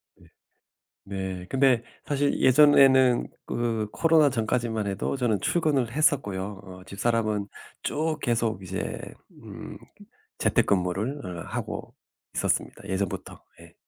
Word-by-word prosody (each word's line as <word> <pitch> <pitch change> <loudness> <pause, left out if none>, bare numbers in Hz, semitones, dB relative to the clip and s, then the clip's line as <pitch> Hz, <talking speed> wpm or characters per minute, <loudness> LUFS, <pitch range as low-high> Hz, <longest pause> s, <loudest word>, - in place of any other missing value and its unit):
네. - - -22 0.8
네 95 -2 -5
근데 130 -3 +3 0.2
사실 145 0 0
예전에는 130 -2 +6 0.2
그 115 -3 -2
코로나 160 0 +4
전까지만 115 -3 -1
해도 100 +7 -2
저는 115 -6 +1
출근을 145 -9 +1
했었고요. 105 - 0
어 95 -1 -11
집사람은 105 0 -1 0.4
쭉 155 +1 -1
계속 115 -4 0
이제 95 +1 -4 0.4
음 - - -9 0.6
재택근무를 100 +9 +1
음 90 -2 -6
하고 - - -5 0.4
있었습니다 - - -1
예전부터 95 -1 -4 0.2
예. 85 0 -16
115 Hz, 250 characters per minute, -26 LUFS, 95-135 Hz, 0.8 s, 예전에는